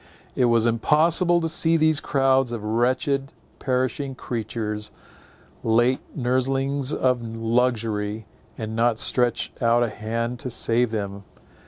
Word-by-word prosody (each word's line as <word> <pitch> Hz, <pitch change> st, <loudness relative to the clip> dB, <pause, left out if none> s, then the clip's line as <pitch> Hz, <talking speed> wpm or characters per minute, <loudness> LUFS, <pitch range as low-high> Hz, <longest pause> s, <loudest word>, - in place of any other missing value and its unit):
It 125 Hz, -, +2 dB
was 115 Hz, -1 st, +3 dB
impossible 165 Hz, +9 st, +3 dB
to 165 Hz, -, -1 dB
see 165 Hz, 0 st, +2 dB
these 155 Hz, -1 st, +3 dB
crowds 135 Hz, -2 st, +1 dB
of 115 Hz, -3 st, -5 dB
wretched, 130 Hz, +5 st, 0 dB, 0.3 s
perishing 130 Hz, +1 st, -2 dB
creatures, 110 Hz, -3 st, -4 dB, 0.7 s
late 120 Hz, +3 st, +2 dB, 0.2 s
nurslings 135 Hz, +2 st, 0 dB
of 125 Hz, -4 st, +1 dB
luxury, 115 Hz, -2 st, -1 dB, 0.3 s
and 110 Hz, 0 st, -5 dB
not 115 Hz, 0 st, +2 dB
stretch 120 Hz, 0 st, +1 dB
out 120 Hz, 0 st, +3 dB
a 120 Hz, -, 0 dB
hand 115 Hz, +3 st, -3 dB
to 130 Hz, -, -5 dB
save 120 Hz, 0 st, +1 dB
them. 100 Hz, -2 st, -4 dB
120 Hz, 125 wpm, -23 LUFS, 115-135 Hz, 0.7 s, was